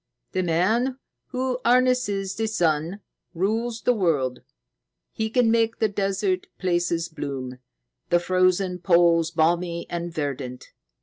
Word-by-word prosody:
"The 185 - 0
man 215 +10 +1 0.3
who 255 -1 -2
harnesses 240 -6 +2
the 220 +2 -2
sun 170 -1 0 0.3
rules 225 +6 -1
the 250 - +4
world. 150 - 0 0.7
He 220 0 -2
can 240 -1 +3
make 230 0 +2
the 220 - +1
desert 195 -1 -1
places 175 -2 0
bloom, 135 -5 -6 0.5
the 175 - +4
frozen 185 +1 +1
poles 170 -2 +4
balmy 170 +1 0
and 170 0 -3
verdant. 140 -5 -5
185 Hz, 120 wpm, -24 LUFS, 165-220 Hz, 0.7 s, the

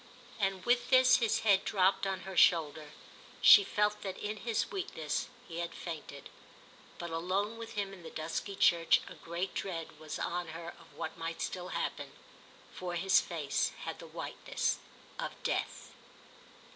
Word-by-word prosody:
And 195 -2 0
with 245 0 +2
this 255 -1 +7
his 230 -3 +1
head 200 -3 +4
dropped 195 0 +2
on 190 -1 -2
her 190 0 -7
shoulder; 155 -3 +4 0.5
she 410 - +9
felt 210 - 0
that 190 -2 -5
in 210 +1 -4
his 230 0 -1
weakness 160 - -2 0.2
he 165 0 -6
had 170 -1 -4
fainted. 155 -4 -7 0.7
But 170 -1 -6
alone 185 +6 -1
with 230 0 -7
him 200 -2 -2
in 190 - -11
the 165 - -8
dusky 165 +6 -4
church 170 -3 +4
a - - -8
great 170 +3 -4
dread 165 -5 -5
was 155 -1 -5
on 175 0 -2
her 170 0 -7
of - - -15
what 160 - -5
might 165 0 -4
still 180 -1 -3
happen, - - -3 0.6
for 180 -1 -4
his 190 +3 +4
face 160 -5 -1
had - - -5
the - - -9
whiteness - - -2 0.4
of - - -3
death. - - -2
185 Hz, 160 wpm, -32 LUFS, 165-205 Hz, 0.7 s, she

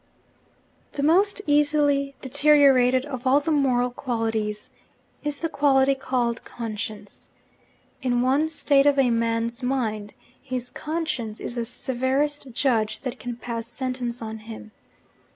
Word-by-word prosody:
The 280 - -3
most 395 +6 +3
easily 290 -1 +2
deteriorated 265 -2 +4
of 260 -3 -5
all 270 +2 +5
the 295 +2 -2
moral 250 -4 +2
qualities 225 -4 -3 0.5
is 295 -1 -2
the 330 - 0
quality 275 -3 +3
called 250 -3 -1
'conscience.' 215 -2 -7 0.7
In 245 -2 +1
one 280 +5 +2
state 285 -2 +3
of 285 -1 +4
a 260 -3 +4
man's 230 +1 -1
mind, 225 -5 -2 0.3
his 255 -2 -4
conscience 300 -9 -3
is - - -5
the 235 -1 -2
severest 265 +3 -1
judge 230 -4 0
that 255 -2 -5
can 245 -1 -5
pass 235 -1 -5
sentence 245 -1 -4
on 220 0 -6
him. 215 0 -10
255 Hz, 130 wpm, -24 LUFS, 235-285 Hz, 0.7 s, all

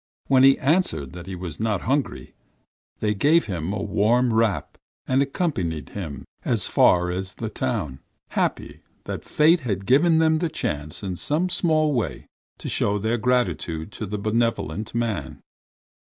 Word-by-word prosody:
When 130 -1 +4
he 135 0 +7
answered 140 - 0
that 90 0 -9
he 95 - -5
was 85 -3 -6
not 110 -4 0
hungry, 140 +3 -2 0.7
they 105 -1 +1
gave 150 +11 +3
him 90 -3 -3
a 105 - -3
warm 120 +3 +2
wrap 110 -3 0 0.3
and 130 +1 +3
accompanied 115 - -2
him 80 -8 -6 0.2
as - - 0
far 90 0 +3
as 95 +3 -4
the 110 -2 -5
town, 65 -2 -3 0.3
happy - - -2 0.2
that - - -5
fate 160 +3 +4
had 100 - -3
given 160 - +4
them 160 -1 +3
the 170 -1 0
chance 75 - -3
in 95 -3 -3
some 160 - 0
small 155 -4 +2
way 120 -4 -2 0.3
to - - -8
show 100 0 +1
their 110 +3 -1
gratitude 90 -8 0
to 110 - -6
the 105 +2 -3
benevolent 110 -1 -1
man. 115 -3 -2
110 Hz, 155 wpm, -24 LUFS, 90-135 Hz, 0.7 s, he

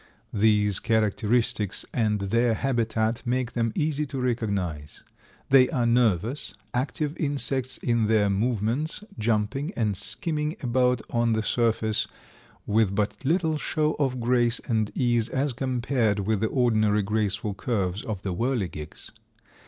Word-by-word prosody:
These 105 -2 +3
characteristics 110 -1 +1
and 110 -3 +1
their 115 +4 +1
habitat 115 -3 0
make 125 0 -1
them 115 -1 0
easy 150 -1 0
to 135 - -6
recognize. 100 - -2 0.5
They 130 -1 +6
are 120 -2 0
nervous, 115 - +1 0.2
active 145 +4 -1
insects 135 -3 -1
in 115 -3 +1
their 110 -2 +3
movements, 115 - 0 0.2
jumping 115 - 0
and 105 -4 +1
skimming 150 - -2
about 125 0 +2
on 120 -1 +2
the 110 0 0
surface 110 -2 +1 0.6
with 105 -2 +2
but 105 +5 -1
little 160 +1 +1
show 155 0 0
of 130 -3 0
grace 120 0 +2
and 110 -3 0
ease 120 -3 +1
as 135 +1 -1
compared 125 -4 0
with 105 +1 0
the 110 - +1
ordinary 110 -5 +2
graceful 105 0 -1
curves 100 -2 -2
of 105 -4 -5
the 95 - -2
whirligigs. 95 - -3
115 Hz, 130 wpm, -26 LUFS, 105-130 Hz, 0.6 s, They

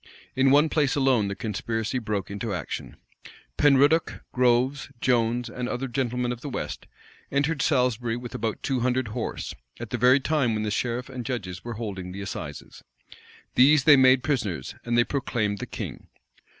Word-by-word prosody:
In 135 +1 +4
one 145 +3 +5
place 150 -3 +1
alone 130 -7 +3
the 100 - -3
conspiracy 110 +2 -2
broke 105 -4 -3
into 100 0 -3
action. 85 - -6 0.6
Penruddoc, 145 +3 +3
Groves, 125 +3 +2
Jones, 120 0 +1
and 125 +1 -4
other 135 +2 -3
gentlemen 125 -1 -1
of 120 -1 -6
the 145 - -5
west, - - -5 0.4
entered 140 +1 +1
Salisbury 125 -4 +1
with 120 -1 -8
about 110 -2 -3
two 135 -2 0
hundred 125 -1 0
horse, 110 +1 -4 0.3
at - - -7
the 125 - -2
very 125 +3 +6
time 135 -5 +1
when 110 - -1
the 105 - -2
sheriff 120 +3 -2
and 130 -3 -6
judges 95 -8 -5
were 120 - -5
holding 95 -5 -5
the 100 - -6
assizes. 100 - -7 0.7
These 140 +2 +6
they 150 0 +8
made 130 -1 +5
prisoners; 105 - -2
and 120 0 0
they 120 - +6
proclaimed 120 -7 -2
the - - -5
king. - - -7
125 Hz, 170 wpm, -26 LUFS, 110-135 Hz, 0.7 s, they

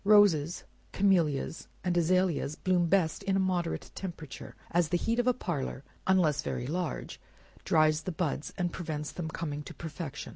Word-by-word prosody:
Roses, 195 -6 +5 0.3
camelias, 170 -7 +2 0.2
and 180 -1 +1
azaleas 175 -3 +2
bloom 180 0 +2
best 165 -3 +2
in 195 -1 0
a - - +3
moderate 180 -3 -1
temperature, 165 -7 -7 0.2
as 170 -2 +2
the 175 - +2
heat 230 +6 0
of 245 - +2
a 250 - +5
parlor 145 - -3 0.2
(unless 175 -6 +4
very 125 - -3
large) 170 +5 -3 0.4
dries 155 0 +4
the 185 - -3
buds, 155 -3 -2
and 175 -2 -1
prevents 150 -4 -4
their 175 -3 -4
coming 155 -2 -4
to - - -9
perfection. 160 -2 -6
170 Hz, 160 wpm, -30 LUFS, 155-185 Hz, 0.4 s, Roses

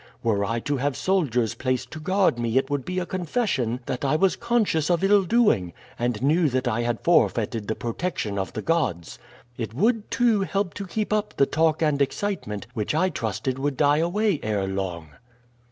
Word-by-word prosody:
Were 105 -3 +1
I 115 +3 -1
to 145 +2 -1
have 140 +1 -1
soldiers 130 - +1
placed 130 -1 -2
to 155 - -7
guard 185 -5 +2
me 120 +1 0
it 135 +1 +1
would 140 -2 -1
be 180 0 -4
a 180 - 0
confession 175 - -1
that 125 - -4
I 140 +2 +2
was 185 +4 +3
conscious 220 -10 +1
of 175 0 +2
ill 200 +1 +5
doing, 180 - +2 0.3
and 120 -1 -1
knew 155 +3 +3
that 130 0 -1
I 120 0 0
had 120 -3 -1
forfeited 110 -3 +2
the 110 - -1
protection 115 - -3
of 95 - -4
the - - -4
gods. 110 - -1 0.4
It 115 -1 -4
would, 220 - +1
too, 230 -4 +2
help 195 -2 -1
to 200 +3 -6
keep 210 +3 -2
up 210 0 -1
the 140 - +5
talk 160 +2 +1
and 150 -2 +1
excitement, 140 - -2
which 110 +3 -2
I 185 +4 +2
trusted 120 - -3
would 140 -1 -1
die 145 0 +4
away 185 +1 +1
ere 105 -3 -1
long." 95 -5 -4
145 Hz, 195 wpm, -24 LUFS, 115-185 Hz, 0.4 s, ill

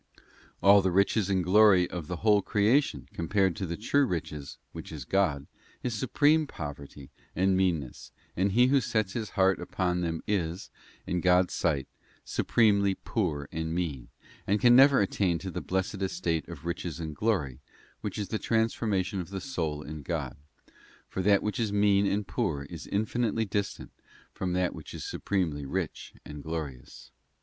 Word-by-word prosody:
All 100 +1 +7
the 95 - +1
riches 100 +2 +2
and 95 -2 +1
glory 95 -1 +5
of 85 -4 -6
the 90 - -3
whole 105 -2 +5
creation 105 - +1
compared 95 +3 0
with 95 -4 -3
the 85 - -3
true 140 +6 +2
riches, 75 -6 -5
which - - -9
is 75 -6 -7
God, 80 -7 +1 0.4
is 125 - -1
supreme 145 +7 +2
poverty 70 - -8 0.2
and 95 +1 +2
meanness, 85 -9 -1 0.2
and 95 +2 +1
he 120 +3 +5
who 135 +1 +3
sets 110 -5 -1
his 110 -4 -3
heart 95 -1 +3
upon 90 0 -1
them 80 -2 -2
is, 90 -4 -2 0.3
in 90 0 -1
God's 90 0 +3
sight, 75 -6 0 0.4
supremely 100 -4 +2
poor 80 -12 -2
and 80 0 -3
mean, 75 -8 -3 0.4
and 105 +2 +2
can 120 +1 +6
never 135 -1 +7
attain 95 -3 +1
to 95 +3 -6
the - - -4
blessed 95 +1 -2
estate 85 -4 -1
of 85 -2 -9
riches 85 -1 -4
and 80 -2 -5
glory, 75 - -1 0.4
which - - -5
is 100 -3 -3
the 110 - -2
transfor 115 0 0
mation 95 -1 0
of 85 - -9
the 95 0 -4
soul 80 - -3
in 75 +1 -7
God; 70 - -3 0.7
for 95 - -3
that 100 +1 +3
which 105 +5 -2
is 110 -3 0
mean 100 -1 +3
and 100 +1 0
poor 70 -1 -1
is 80 +3 -9
infinitely 110 +2 0
distant 100 0 -3 0.4
from 90 -1 -3
that 90 -1 0
which - - -9
is - - -6
supremely 85 -8 -2
rich 70 - -4
and 75 0 -8
glorious. 75 -5 -7
95 Hz, 170 wpm, -28 LUFS, 80-105 Hz, 0.7 s, All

